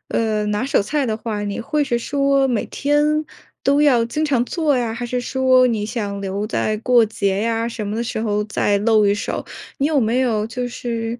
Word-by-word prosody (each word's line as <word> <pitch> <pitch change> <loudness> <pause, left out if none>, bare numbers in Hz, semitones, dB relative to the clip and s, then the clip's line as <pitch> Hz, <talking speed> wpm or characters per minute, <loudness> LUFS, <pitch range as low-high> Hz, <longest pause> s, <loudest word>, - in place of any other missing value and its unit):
呃， 215 -2 0
拿 210 +3 -1
手 270 - +2
菜 285 +8 -1
的 225 -4 -1
话， 215 -2 -4
你 205 -1 -3
会 295 +5 0
是 240 -3 0
说 275 +2 +1
每 235 -4 0
天 300 +2 +1 0.4
都 280 +2 +3
要 255 -6 +4
经 305 +6 -2
常 270 -5 +2
做 310 -5 0
呀？ 235 -3 -1
还 240 +1 -5
是 245 +1 -2
说 255 0 +3
你 220 -4 -1
想 205 -3 -4
留 200 +2 -3
在 215 -1 -1
过 240 0 +4
节 200 -2 -1
呀 230 0 0
什 215 -3 -5
么 205 - -3
的 235 - -1
时 225 - -4
候 210 -2 0
再 205 -1 0
露 215 0 +3
一 200 - +3
手？ 205 - -4 0.3
你 280 - +2
有 305 -3 +2
没 235 +2 +1
有 220 -4 0
就 245 +2 -4
是 235 -1 -4
235 Hz, 230 characters per minute, -20 LUFS, 215-265 Hz, 0.4 s, 要